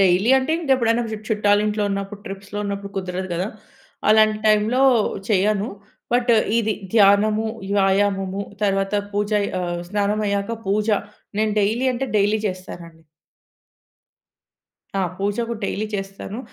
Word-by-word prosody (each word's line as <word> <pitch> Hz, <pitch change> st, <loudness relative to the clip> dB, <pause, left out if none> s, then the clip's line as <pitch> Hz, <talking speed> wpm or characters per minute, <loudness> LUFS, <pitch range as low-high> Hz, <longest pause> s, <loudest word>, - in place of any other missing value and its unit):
Daily 195 Hz, +5 st, +4 dB
అంటే 265 Hz, +4 st, -1 dB
ఇంక 300 Hz, -, -4 dB
ఎప్పుడైనా 235 Hz, -1 st, +1 dB
చు -, -, -2 dB
చుట్టాలింట్లో 210 Hz, 0 st, +2 dB
ఉన్నప్పుడు, 200 Hz, +1 st, -4 dB
ట్రిప్స్‌లో 195 Hz, +1 st, -7 dB
ఉన్నప్పుడు 200 Hz, 0 st, -4 dB
కుదరదు 185 Hz, 0 st, -3 dB
గదా! 185 Hz, +5 st, -1 dB, 0.6 s
అలాంటి 215 Hz, 0 st, +5 dB
టైమ్‌లో 215 Hz, +4 st, +3 dB, 0.5 s
చేయను. 210 Hz, +1 st, +2 dB, 0.4 s
బట్, 245 Hz, 0 st, +2 dB, 0.3 s
ఇది 220 Hz, -2 st, +1 dB, 0.2 s
ధ్యానము, 210 Hz, +1 st, +4 dB, 0.3 s
వ్యాయామము 195 Hz, 0 st, +1 dB, 0.2 s
తరువాత 195 Hz, 0 st, +1 dB, 0.2 s
పూజ 205 Hz, +1 st, -1 dB, 0.3 s
ఆహ్, 175 Hz, -1 st, -2 dB
స్నానమయ్యాక 205 Hz, 0 st, 0 dB, 0.2 s
పూజ, 210 Hz, +2 st, +1 dB, 0.5 s
నేను 215 Hz, 0 st, +1 dB
డైలీ 225 Hz, +6 st, +1 dB
అంటే 265 Hz, +2 st, -2 dB
డైలీ 205 Hz, +2 st, +3 dB
చేస్తానండి. 175 Hz, -3 st, -7 dB, 1.9 s
ఆ! -, -, +1 dB, 0.2 s
పూజ 200 Hz, +1 st, -1 dB
కూడా 230 Hz, -2 st, -4 dB
డైలీ 210 Hz, +2 st, -2 dB
చేస్తాను. 195 Hz, +2 st, -5 dB
205 Hz, 120 wpm, -22 LUFS, 195-215 Hz, 1.9 s, అలాంటి